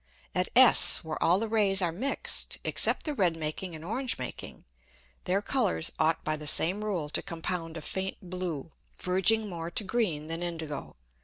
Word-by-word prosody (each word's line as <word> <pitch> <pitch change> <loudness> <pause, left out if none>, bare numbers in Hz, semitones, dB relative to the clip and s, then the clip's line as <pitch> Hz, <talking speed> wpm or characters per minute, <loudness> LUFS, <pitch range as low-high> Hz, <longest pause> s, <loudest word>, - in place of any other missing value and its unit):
At 180 0 0
S 255 -6 +7
where 160 -1 -6
all 175 +2 +3
the 225 +3 -2
Rays 205 -3 +2
are 175 -3 +1
mixed, 250 +12 -2
except - - +2
the 305 - -2
red 180 - +1
making 160 +3 -4
and 160 +1 -10
orange 245 +6 -1
making, 125 -1 -7 0.6
their 195 +3 0
Colours 220 -10 +1
ought 160 +1 +1
by 155 - -1
the 150 0 -6
same 185 +7 +5
Rule 185 -8 -2
to - - -2
compound 165 -2 -5
a - - -7
faint 190 +4 -3
blue, 175 -5 -5 0.3
verging 200 +4 +2
more 170 -3 -5
to 190 - -1
green 185 -8 -1
than 165 +2 -5
indigo. 165 -4 -6
180 Hz, 175 wpm, -28 LUFS, 160-205 Hz, 0.6 s, S